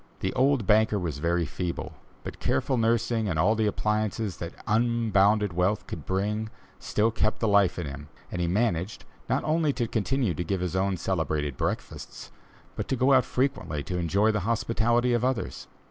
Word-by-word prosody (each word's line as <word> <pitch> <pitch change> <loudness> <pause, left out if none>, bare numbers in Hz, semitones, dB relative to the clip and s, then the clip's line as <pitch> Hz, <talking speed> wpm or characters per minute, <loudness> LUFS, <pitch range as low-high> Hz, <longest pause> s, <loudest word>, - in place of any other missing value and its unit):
The 95 - -1
old 130 -3 +2
banker 110 +1 +4
was 80 -7 -3
very 85 +2 +1
feeble, 85 +3 -4 0.3
but - - -7
careful 100 - 0
nursing 115 -1 +1
and 80 - -1
all 95 +8 +4
the 110 -1 +1
appliances 105 -1 -1
that 85 +1 -6
unbounded 110 -3 +2
wealth 90 +4 0
could - - -8
bring, 105 +3 -1 0.3
still 110 +2 +1
kept 110 -1 0
the 115 - +1
life 100 -3 +3
in 90 - -3
him 70 +1 -7 0.2
and 90 - -3
he 85 - +1
managed, 95 -1 -1 0.2
not - - +1
only 155 -1 +2
to 125 -3 -1
continue 110 0 0
to 85 - -3
give 90 +2 -2
his 90 0 -2
own 95 0 +1
celebrated 80 -6 -1
breakfasts, - - -5 0.4
but - - -4
to - - 0
go 130 +2 +3
out 130 -1 +5
frequently 125 - -1
to 90 +3 -3
enjoy 100 +6 +2
the 105 - 0
hospitality 120 +2 +1
of 120 0 +1
others. 115 - -2
105 Hz, 180 wpm, -27 LUFS, 90-115 Hz, 0.4 s, out